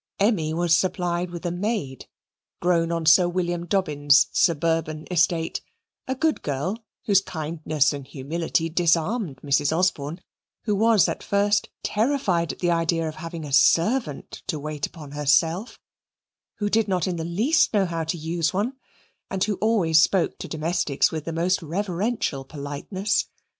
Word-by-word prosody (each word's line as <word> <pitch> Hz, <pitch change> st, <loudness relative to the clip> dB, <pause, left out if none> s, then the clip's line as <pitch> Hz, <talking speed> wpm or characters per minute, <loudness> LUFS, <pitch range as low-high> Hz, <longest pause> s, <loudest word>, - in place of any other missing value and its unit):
Emmy 195 Hz, -7 st, +2 dB
was 170 Hz, 0 st, +2 dB
supplied 180 Hz, -1 st, -1 dB
with 175 Hz, 0 st, -8 dB
a 175 Hz, -, 0 dB
maid, 175 Hz, -, -3 dB, 0.5 s
grown 170 Hz, -1 st, +1 dB
on 165 Hz, -1 st, -2 dB
Sir 175 Hz, +3 st, +6 dB
William 175 Hz, -1 st, -2 dB
Dobbin's 145 Hz, -6 st, +3 dB
suburban 160 Hz, -1 st, +1 dB
estate; 165 Hz, -1 st, +1 dB, 0.5 s
a 260 Hz, -, -1 dB
good 315 Hz, +3 st, 0 dB
girl, 165 Hz, -, -3 dB, 0.2 s
whose 200 Hz, -3 st, +4 dB
kindness 155 Hz, -4 st, -1 dB
and 140 Hz, -2 st, -7 dB
humility 160 Hz, +4 st, -2 dB
disarmed 170 Hz, -, +1 dB
Mrs. 145 Hz, 0 st, +2 dB
Osborne, 165 Hz, -2 st, 0 dB, 0.4 s
who 210 Hz, -, 0 dB
was 220 Hz, -2 st, +4 dB
at -, -, -3 dB
first 205 Hz, +1 st, +1 dB
terrified 210 Hz, -, 0 dB
at -, -, -10 dB
the 175 Hz, -1 st, 0 dB
idea 165 Hz, -1 st, +1 dB
of 155 Hz, -, -4 dB
having 165 Hz, 0 st, -7 dB
a 140 Hz, -, -7 dB
servant 165 Hz, -, +2 dB
to 155 Hz, -, -1 dB
wait 150 Hz, -1 st, -4 dB
upon 150 Hz, -5 st, -12 dB
herself, 150 Hz, -, +1 dB, 0.8 s
who 205 Hz, -, -2 dB
did 220 Hz, +1 st, +2 dB
not 185 Hz, -4 st, 0 dB
in 180 Hz, -2 st, -2 dB
the 165 Hz, -, -3 dB
least 230 Hz, -, +2 dB
know 205 Hz, -3 st, +2 dB
how 165 Hz, -2 st, -3 dB
to 160 Hz, +2 st, -2 dB
use 165 Hz, 0 st, -1 dB
one, 210 Hz, +7 st, -1 dB, 0.6 s
and 190 Hz, -1 st, -1 dB
who 210 Hz, -, 0 dB
always 185 Hz, -8 st, +3 dB
spoke 185 Hz, +2 st, +1 dB
to -, -, -6 dB
domestics 160 Hz, -2 st, 0 dB
with 155 Hz, -2 st, -5 dB
the 165 Hz, -, -3 dB
most 175 Hz, +3 st, 0 dB
reverential 180 Hz, -, -2 dB
politeness. 145 Hz, +8 st, -3 dB
170 Hz, 155 wpm, -24 LUFS, 155-195 Hz, 0.8 s, Sir